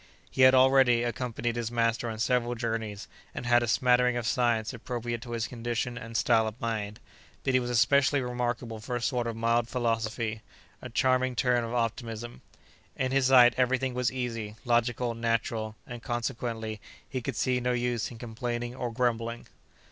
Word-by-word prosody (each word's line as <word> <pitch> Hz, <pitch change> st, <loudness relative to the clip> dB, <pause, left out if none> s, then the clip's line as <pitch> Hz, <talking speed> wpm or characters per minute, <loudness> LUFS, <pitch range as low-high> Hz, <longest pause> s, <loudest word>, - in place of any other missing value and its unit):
He -, -, -1 dB
had, 130 Hz, 0 st, +8 dB
already, 130 Hz, -2 st, +5 dB
accompanied 120 Hz, 0 st, -2 dB
his 120 Hz, -1 st, -2 dB
master 115 Hz, +1 st, 0 dB
on 110 Hz, -, -5 dB
several 120 Hz, +1 st, +1 dB
journeys, 110 Hz, -3 st, -3 dB, 0.3 s
and -, -, -5 dB
had 120 Hz, 0 st, +4 dB
a 120 Hz, -, -1 dB
smattering 125 Hz, +1 st, +3 dB
of 120 Hz, -, -3 dB
science 115 Hz, -1 st, +1 dB
appropriate 120 Hz, -1 st, -4 dB
to 120 Hz, -1 st, -7 dB
his 115 Hz, -1 st, -1 dB
condition 120 Hz, 0 st, -3 dB
and 115 Hz, 0 st, -5 dB
style 110 Hz, -1 st, +3 dB
of 110 Hz, +2 st, -7 dB
mind, 110 Hz, -2 st, -3 dB, 0.4 s
but 135 Hz, -, 0 dB
he 130 Hz, -, +5 dB
was 120 Hz, -1 st, -3 dB
especially 135 Hz, +4 st, +3 dB
remarkable 120 Hz, -2 st, -3 dB
for 120 Hz, +3 st, -4 dB
a 120 Hz, -, -2 dB
sort 125 Hz, -3 st, 0 dB
of 115 Hz, -, -3 dB
mild 115 Hz, +1 st, +1 dB
philosophy, 115 Hz, -2 st, -1 dB, 0.4 s
a -, -, -7 dB
charming 130 Hz, -1 st, +1 dB
turn 125 Hz, -1 st, +2 dB
of 115 Hz, +1 st, -4 dB
optimism. 115 Hz, 0 st, -3 dB, 0.5 s
In 130 Hz, 0 st, -1 dB
his 135 Hz, -1 st, +3 dB
sight 125 Hz, -2 st, +7 dB
every 130 Hz, 0 st, +3 dB
thing 130 Hz, 0 st, -2 dB
was 125 Hz, -1 st, 0 dB
easy, 115 Hz, -4 st, -4 dB
logical, 120 Hz, 0 st, +1 dB
natural, 115 Hz, -1 st, -1 dB
and, 120 Hz, -1 st, -8 dB
consequently, 115 Hz, -3 st, -3 dB, 0.3 s
he 130 Hz, -, -4 dB
could 130 Hz, +1 st, -4 dB
see 125 Hz, +3 st, +1 dB
no 125 Hz, 0 st, 0 dB
use 120 Hz, -1 st, -1 dB
in 120 Hz, -, -10 dB
complaining 120 Hz, +1 st, -4 dB
or 125 Hz, -2 st, -4 dB
grumbling. 115 Hz, -1 st, -1 dB
120 Hz, 180 wpm, -28 LUFS, 115-125 Hz, 0.5 s, had